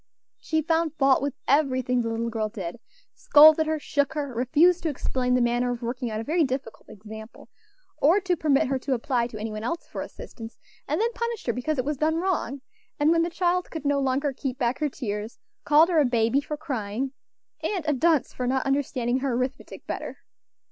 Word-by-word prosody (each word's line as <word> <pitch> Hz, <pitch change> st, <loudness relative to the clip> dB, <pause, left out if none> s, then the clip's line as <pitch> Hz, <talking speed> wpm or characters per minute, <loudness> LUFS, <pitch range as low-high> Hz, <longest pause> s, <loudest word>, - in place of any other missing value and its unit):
She 315 Hz, -1 st, -1 dB
found 325 Hz, -1 st, 0 dB
fault 270 Hz, -2 st, +3 dB
with 280 Hz, -1 st, -2 dB
everything 255 Hz, -4 st, +2 dB
the 230 Hz, -, -2 dB
little 230 Hz, +1 st, -2 dB
girl 220 Hz, -1 st, -2 dB
did; 195 Hz, -1 st, -6 dB, 0.3 s
scolded 310 Hz, +1 st, +6 dB
her, 315 Hz, 0 st, 0 dB
shook 285 Hz, -1 st, -1 dB
her, 285 Hz, -4 st, -3 dB
refused 315 Hz, +9 st, +3 dB
to 330 Hz, -, -1 dB
explain 255 Hz, -3 st, -1 dB
the 250 Hz, -, +3 dB
manner 240 Hz, +1 st, +1 dB
of 245 Hz, 0 st, -5 dB
working 245 Hz, +1 st, -3 dB
out 215 Hz, 0 st, -3 dB
a -, -, -3 dB
very 320 Hz, +6 st, +2 dB
difficult 260 Hz, -4 st, -4 dB
example, 220 Hz, +2 st, -11 dB, 0.5 s
or 335 Hz, +8 st, +4 dB
to 370 Hz, -2 st, 0 dB
permit 290 Hz, -5 st, +2 dB
her 265 Hz, 0 st, -1 dB
to 265 Hz, 0 st, -1 dB
apply 240 Hz, -1 st, 0 dB
to 230 Hz, -, -9 dB
any 215 Hz, +1 st, -4 dB
one 215 Hz, 0 st, -6 dB
else 335 Hz, +9 st, -3 dB
for -, -, -6 dB
assistance, 225 Hz, -1 st, -9 dB, 0.3 s
and -, -, 0 dB
then 465 Hz, +2 st, +1 dB
punished 470 Hz, -2 st, -4 dB
her 235 Hz, -, 0 dB
because 280 Hz, +5 st, -2 dB
it 255 Hz, -, -1 dB
was 295 Hz, 0 st, -2 dB
done 310 Hz, +3 st, +1 dB
wrong; 330 Hz, -6 st, -1 dB, 0.4 s
and 295 Hz, +2 st, +4 dB
when 330 Hz, 0 st, +3 dB
the 335 Hz, -, 0 dB
child 355 Hz, +1 st, 0 dB
could 320 Hz, -2 st, -7 dB
no 285 Hz, 0 st, +2 dB
longer 270 Hz, +1 st, 0 dB
keep 260 Hz, -1 st, -4 dB
back 245 Hz, -1 st, 0 dB
her 300 Hz, -1 st, 0 dB
tears, 215 Hz, -4 st, -5 dB, 0.3 s
called 300 Hz, +3 st, +6 dB
her 335 Hz, -3 st, +3 dB
a 295 Hz, -, +4 dB
baby 235 Hz, +2 st, +2 dB
for 300 Hz, +1 st, -5 dB
crying, 255 Hz, -4 st, -3 dB, 0.5 s
and 370 Hz, -7 st, -2 dB
a 300 Hz, -, +3 dB
dunce 310 Hz, 0 st, +2 dB
for 250 Hz, -, -3 dB
not 260 Hz, +1 st, 0 dB
understanding 260 Hz, -3 st, 0 dB
her 265 Hz, -1 st, -1 dB
arithmetic 255 Hz, +2 st, -4 dB
better. -, -, -5 dB
270 Hz, 210 wpm, -25 LUFS, 240-310 Hz, 0.5 s, scolded